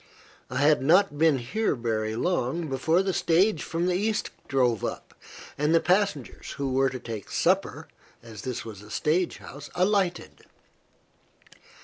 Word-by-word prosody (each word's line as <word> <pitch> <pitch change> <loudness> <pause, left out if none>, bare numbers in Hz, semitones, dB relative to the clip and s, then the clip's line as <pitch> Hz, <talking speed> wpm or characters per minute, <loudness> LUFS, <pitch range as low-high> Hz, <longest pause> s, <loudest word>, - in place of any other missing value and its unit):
I - - -4
had 150 +1 +4
not 165 +2 +3
been 160 -3 +4
here 150 - -1
very 110 -2 -2
long 165 +2 -1
before 160 +7 +2
the 190 -1 -1
stage 175 +1 +2
from 165 +1 -2
the 180 - +1
East 210 +4 -1 0.2
drove 125 -5 +1
up, - - -5 0.5
and 150 +3 +3
the - - +6
passengers, 180 - -1
who 135 -2 -3
were 135 +1 +3
to 130 - -6
take 115 -5 -7
supper, - - 0 0.4
as 110 -3 -10
this 125 -2 -4
was 105 -3 -9
a 105 - -14
stage 165 +9 0
house, 145 +1 -10
alighted. 185 -1 0
150 Hz, 150 wpm, -26 LUFS, 125-180 Hz, 0.5 s, the